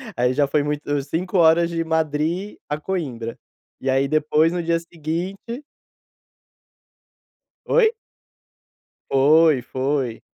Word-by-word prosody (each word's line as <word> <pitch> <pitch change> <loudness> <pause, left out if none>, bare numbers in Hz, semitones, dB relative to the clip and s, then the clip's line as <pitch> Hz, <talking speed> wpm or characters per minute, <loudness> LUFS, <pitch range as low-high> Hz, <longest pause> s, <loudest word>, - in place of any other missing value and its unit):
aí 125 +1 +1
já 145 +1 +2
foi 145 +1 +1
muito 145 -1 -2
5 180 +7 -2
horas 170 0 +5
de 165 -1 -2
Madri 160 +4 -1
a 150 +1 -2
Coimbra. 135 -11 -4 0.4
E 135 - -2
aí 135 +1 +2
depois 155 +2 +2
no 175 -1 -2
dia 165 0 +1
seguinte 175 - -5 2.0
Oi? 470 -3 +4 1.2
Foi, 150 +1 +4
foi. 130 -1 -2
155 Hz, 110 wpm, -22 LUFS, 140-170 Hz, 2.0 s, horas